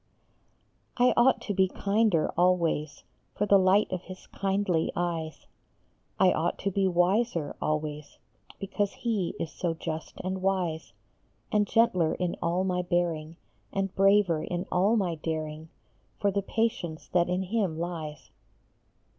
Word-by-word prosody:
OUGHT 250 +1 +4
to 205 - -3
be 190 0 +3
kinder 200 -3 +1
always, 170 -4 +1 0.3
For 205 - 0
the 200 -1 +5
light 190 +3 +4
of 185 -2 -2
his 185 0 -10
kindly 195 -4 0
eyes; 165 -3 -3 0.7
I 185 -1 +6
ought 170 +2 0
to 200 - -1
be 195 0 +1
wiser 180 -2 +1
always, 150 -1 -3 0.4
Because 200 +1 -2
he 215 -7 -2
is 165 - -3
so 170 -3 -2
just 160 -1 -5
and 190 0 -3
wise; 185 -4 -1 0.6
And 210 -1 +2
gentler 185 -9 +3
in 180 -1 -2
all 175 +2 +1
my 180 -1 0
bearing, 170 -3 -1 0.4
And 195 -1 -2
braver 195 -4 +4
in 175 +3 -3
all 195 +5 +3
my 190 -6 +1
daring, 155 0 -4 0.5
For 200 - +2
the 200 +1 0
patience 195 -6 -2
that 175 -1 +2
in 180 +1 0
him 190 -4 -1
lies. 160 -5 -5
180 Hz, 140 wpm, -28 LUFS, 165-195 Hz, 0.7 s, I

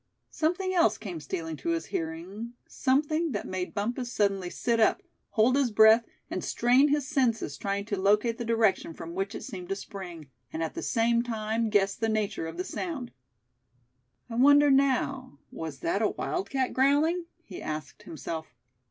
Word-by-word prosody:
Something 365 +4 0
else 335 - +3
came 185 -6 -6
stealing 160 +1 -4
to 140 - -4
his 165 -1 0
hearing, 180 +8 -5
something 305 +3 +1
that - - -3
made 185 +2 -4
Bumpus 240 +4 -2
suddenly 195 -4 0
sit 235 +5 0
up, 220 - +3 0.3
hold 230 +4 +3
his 275 -3 +2
breath, 220 +1 +6 0.2
and - - -4
strain 250 +4 +4
his 290 -1 0
senses 235 - 0
trying 200 0 -2
to 200 -2 -3
locate 210 +4 +2
the - - -2
direction 225 -7 +1
from 165 +1 -8
which 195 +4 -3
it - - -6
seemed 180 -2 -7
to 195 - 0
spring, 180 -6 -8 0.2
and 160 - -2
at 160 - -3
the - - -5
same 235 0 +2
time 225 -1 -1
guess 200 -2 +3
the 225 +1 -1
nature 210 -6 -1
of 165 +1 -8
the 180 - -1
sound. 275 - -5 1.2
"I 235 - -8
wonder 285 +2 +6
now, 270 - +1
was 155 -4 -6
that 195 +5 0
a 215 - +4
wildcat 275 -8 -2
growling?" 295 +6 +3 0.2
he 185 - -9
asked 155 0 -5
himself. 160 0 -6
220 Hz, 170 wpm, -28 LUFS, 185-260 Hz, 1.2 s, breath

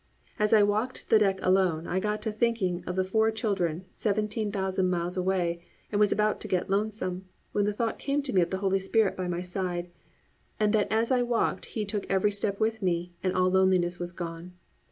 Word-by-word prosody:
As 210 0 +2
I 215 -2 +6
walked 215 +5 -1
the 220 - +6
deck 195 -2 +2
alone 185 -3 +2
I 185 - -1
got 210 +2 -2
to 220 - -1
thinking 210 -6 0
of 180 - -2
the 185 0 +1
four 220 +3 +2
children 190 -6 -1
seventeen 210 0 -1
thousand 190 -2 0
miles 175 0 -1
away 180 -2 0 0.3
and 205 - 0
was 210 -1 +4
about 210 0 +1
to - - -5
get 185 0 -1
lonesome, 195 -3 -1 0.3
when 205 -1 +1
the 210 - +1
thought 225 +2 -2
came 280 +1 -1
to 270 - -4
me 185 - +5
of 170 - +1
the 190 - -2
Holy 195 0 +2
Spirit 205 +2 +2
by 185 -1 -3
my 175 0 -2
side, 180 -1 -3 0.7
and 210 0 +2
that 210 -2 +2
as 225 +3 +1
I 255 -1 +3
walked 240 -1 0
He 215 - 0
took 205 0 -3
every 195 +2 +2
step 200 0 -2
with 220 0 0
me, 175 -1 -1
and 185 -1 -1
all 185 0 +3
loneliness 185 -2 +2
was 175 0 -4
gone. 170 0 -7
195 Hz, 215 wpm, -28 LUFS, 180-215 Hz, 0.7 s, I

